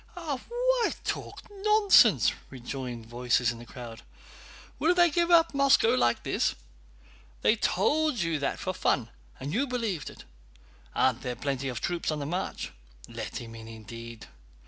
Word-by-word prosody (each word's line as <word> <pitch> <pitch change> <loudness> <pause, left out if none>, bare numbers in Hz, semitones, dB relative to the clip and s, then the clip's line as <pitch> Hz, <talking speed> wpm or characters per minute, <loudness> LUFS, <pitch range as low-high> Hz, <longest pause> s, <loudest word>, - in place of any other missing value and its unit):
"Why 475 - 0
talk - - -4
nonsense?" 415 0 +5 0.2
rejoined 125 -2 -6
voices 120 +1 +1
in 115 - -9
the 120 - -11
crowd. 120 -3 -9 0.8
"Will 345 +3 +3
they 345 -2 +5
give 340 +2 +1
up 335 -2 +5
Moscow 275 -5 +4
like 120 - +2
this? - - 0 0.9
They 215 - +5
told 305 +5 +1
you 165 -5 0
that 140 - -1
for - - -3
fun, - - 0 0.3
and 140 +4 -5
you 270 +7 +1
believed 225 - -2
it! - - -13 0.7
Aren't 130 -1 +2
there 125 -2 -3
plenty 135 -1 -3
of 120 -2 -5
troops 175 -1 -2
on 155 - -1
the 145 - -4
march? 175 +6 -3 0.4
Let - - -6
him 115 -1 -9
in, 110 -1 -10
indeed! 115 +1 -9
150 Hz, 150 wpm, -28 LUFS, -, 0.9 s, nonsense